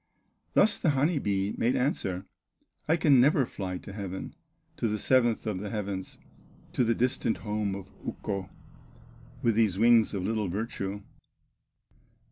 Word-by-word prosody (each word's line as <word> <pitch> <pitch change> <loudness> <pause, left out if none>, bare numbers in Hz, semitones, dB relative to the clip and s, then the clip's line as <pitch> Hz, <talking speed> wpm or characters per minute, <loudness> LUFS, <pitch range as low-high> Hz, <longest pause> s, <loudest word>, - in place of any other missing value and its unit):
Thus 210 - +4
the 160 - +2
honey 150 +3 +2
bee 100 -3 0
made 120 +2 +2
answer: 95 -8 -1 0.6
"I 160 - +3
can 145 -6 +5
never 140 0 +4
fly 95 -5 -5
to 100 - -10
heaven, 95 -2 -5 0.4
To - - 0
the 105 0 -1
seventh 120 0 +2
of 105 -4 -2
the 105 +1 -5
heavens, 100 -3 -4 0.6
To - - +2
the 115 0 +2
distant 125 -1 +1
home 105 -2 -2
of 100 -1 -9
Ukko, 95 -2 -4 0.9
With 115 - +3
these 105 -4 +2
wings 115 -1 +5
of 95 - -2
little 110 -1 0
virtue." 100 0 -4
105 Hz, 145 wpm, -28 LUFS, 100-120 Hz, 0.9 s, can